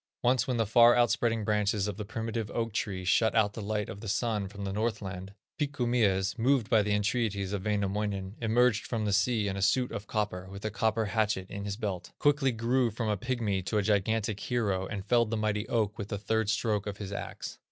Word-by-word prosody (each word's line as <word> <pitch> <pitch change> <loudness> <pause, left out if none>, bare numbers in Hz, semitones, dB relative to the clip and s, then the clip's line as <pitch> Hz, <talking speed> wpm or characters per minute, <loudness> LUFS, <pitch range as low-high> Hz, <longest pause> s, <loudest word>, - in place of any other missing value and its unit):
Once 125 +3 +3
when 125 -2 0
the 115 - +2
far 120 +2 +6
outspreading 115 -1 +2
branches 105 -1 +1
of 105 - -3
the 105 - -5
primitive 115 0 -4
oak 115 -2 -1
tree 95 -3 -2
shut 110 +5 +3
out 105 -2 +3
the 110 - -6
light 105 0 -2
of 100 - -8
the 115 - -7
sun 105 -2 0
from 100 +1 -8
Northland, 100 -2 -3 0.2
Pikku 140 -4 -1
Mies, 100 -4 +1
moved 125 -1 +2
by 110 -2 +6
the 105 0 -1
entreaties 105 -2 0
of 100 0 -3
Wainamoinen, 100 -1 -1
emerged 115 0 +2
from 110 -3 -2
the 100 - 0
sea 105 +1 +2
in 95 - -2
a 100 - -3
suit 125 +5 +2
of 100 +1 -6
copper, 100 -4 -2
with 100 +2 -8
a 110 - -1
copper 110 +1 +1
hatchet 105 -3 0
in 100 0 -5
his 100 -1 -3
belt, 95 -6 -4
quickly 145 -2 +3
grew 120 +2 +1
from 110 +1 -3
a 105 - +2
pigmy 110 -3 -1
to 100 +4 -2
a 105 - +2
gigantic 105 +1 +1
hero, 100 -7 -1
and 100 -3 -5
felled 115 0 +3
the 115 - -1
mighty 105 0 -1
oak 110 -2 0
with 100 - -4
the 105 - -3
third 110 +1 0
stroke 105 -1 0
of 100 -1 -4
his 100 -1 -6
axe. - - -6
105 Hz, 220 wpm, -29 LUFS, 100-115 Hz, 0.2 s, far